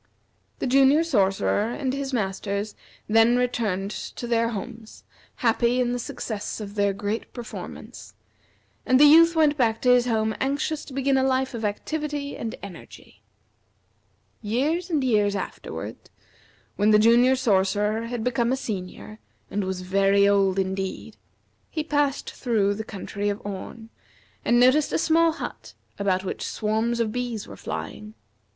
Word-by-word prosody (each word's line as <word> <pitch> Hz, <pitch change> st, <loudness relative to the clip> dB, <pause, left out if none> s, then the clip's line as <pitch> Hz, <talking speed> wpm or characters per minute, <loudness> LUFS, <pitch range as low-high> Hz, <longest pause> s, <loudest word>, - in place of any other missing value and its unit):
The -, -, -3 dB
Junior 275 Hz, +4 st, +5 dB
Sorcerer 205 Hz, -5 st, +1 dB
and 260 Hz, +1 st, -2 dB
his 275 Hz, 0 st, -3 dB
Masters 200 Hz, -2 st, -2 dB, 0.3 s
then 225 Hz, +3 st, +4 dB
returned 215 Hz, -6 st, -1 dB
to 240 Hz, -, -6 dB
their 230 Hz, -1 st, +1 dB
homes, 225 Hz, +1 st, -8 dB, 0.3 s
happy 240 Hz, +1 st, +1 dB
in 245 Hz, -1 st, +1 dB
the 245 Hz, -, -2 dB
success 220 Hz, -3 st, -5 dB
of 205 Hz, -2 st, -7 dB
their 200 Hz, -1 st, +1 dB
great 205 Hz, +3 st, -4 dB
performance; 240 Hz, -2 st, -9 dB, 0.7 s
and 255 Hz, 0 st, +3 dB
the 295 Hz, -, +8 dB
Youth 330 Hz, +3 st, +7 dB
went 300 Hz, -2 st, +3 dB
back 225 Hz, -4 st, +1 dB
to 250 Hz, -, +5 dB
his 250 Hz, 0 st, +4 dB
home 220 Hz, -2 st, +1 dB
anxious 285 Hz, +3 st, -1 dB
to 270 Hz, -, -11 dB
begin 270 Hz, 0 st, +1 dB
a 265 Hz, -, +2 dB
life 260 Hz, 0 st, 0 dB
of 230 Hz, -1 st, -5 dB
activity 290 Hz, +7 st, -3 dB
and 225 Hz, -1 st, -5 dB
energy. 190 Hz, -4 st, -12 dB, 1.2 s
Years 290 Hz, -, -1 dB
and 305 Hz, -5 st, +1 dB
years 210 Hz, -5 st, +2 dB
afterward, 195 Hz, -, -6 dB, 0.7 s
when 205 Hz, +1 st, +3 dB
the 210 Hz, -, +6 dB
Junior 235 Hz, +4 st, +5 dB
Sorcerer 210 Hz, -1 st, +1 dB
had 240 Hz, -1 st, -4 dB
become 240 Hz, 0 st, +1 dB
a 265 Hz, -, +1 dB
Senior 215 Hz, -1 st, -6 dB, 0.3 s
and 205 Hz, 0 st, -1 dB
was 185 Hz, -1 st, -3 dB
very 195 Hz, +2 st, +3 dB
old 195 Hz, -1 st, +3 dB
indeed, 190 Hz, 0 st, -3 dB, 0.5 s
he 310 Hz, -, -3 dB
passed 290 Hz, -2 st, 0 dB
through 215 Hz, -5 st, 0 dB
the 220 Hz, +2 st, -5 dB
country 205 Hz, 0 st, -4 dB
of 205 Hz, +1 st, -3 dB
Orn, 215 Hz, +3 st, -7 dB, 0.5 s
and 240 Hz, 0 st, +3 dB
noticed 260 Hz, +4 st, +4 dB
a -, -, +1 dB
small 330 Hz, 0 st, +3 dB
hut -, -, -8 dB, 0.2 s
about 190 Hz, -2 st, +1 dB
which 190 Hz, -, -5 dB
swarms 220 Hz, +2 st, -1 dB
of 225 Hz, -2 st, 0 dB
bees 240 Hz, -3 st, -4 dB
were -, -, -10 dB
flying. 215 Hz, +1 st, -7 dB
230 Hz, 150 wpm, -25 LUFS, 205-260 Hz, 1.2 s, the